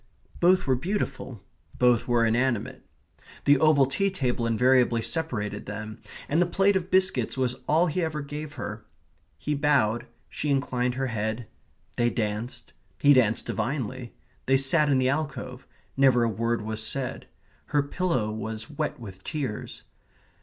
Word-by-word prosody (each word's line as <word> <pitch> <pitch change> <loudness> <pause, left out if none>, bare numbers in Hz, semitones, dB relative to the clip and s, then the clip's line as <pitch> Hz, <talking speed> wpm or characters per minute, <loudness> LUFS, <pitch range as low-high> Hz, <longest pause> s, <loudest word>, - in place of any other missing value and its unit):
Both 185 +2 +4
were 130 - +3
beautiful. 130 - -3 0.3
Both 125 -2 +3
were 120 -1 +3
inanimate. 120 0 0 0.6
The 145 -1 +5
oval 155 -3 +5
tea 195 +9 0
table 125 -10 -1
invariably 120 0 +3
separated 125 -11 -3
them, 105 +1 -6 0.3
and 160 +4 +2
the 175 - +3
plate 195 +3 +3
of 185 -1 -1
biscuits 190 -6 +1
was 125 -1 0
all 160 +3 +4
he 180 +2 -1
ever 155 -2 -2
gave 145 +1 -6
her. - - -6 0.5
He 150 - -2
bowed; 130 -5 +2 0.2
she 150 - -3
inclined 125 -3 0
her 135 +1 -1
head. 110 +2 -2 0.5
They 120 -1 +3
danced. 110 +1 -3 0.3
He 145 0 +6
danced 115 -4 +3
divinely. 130 -2 -3 0.3
They 135 0 +5
sat 145 +3 +3
in 135 - +4
the 130 0 +2
alcove; 135 -3 -3 0.3
never 130 -3 +4
a 115 - +2
word 115 +1 -1
was 110 0 -4
said. 130 +4 -4 0.4
Her 145 -1 +1
pillow 140 -8 -1
was 110 +2 -5
wet 150 0 -3
with 95 -5 -10
tears. 135 -8 -5
130 Hz, 150 wpm, -26 LUFS, 115-150 Hz, 0.6 s, He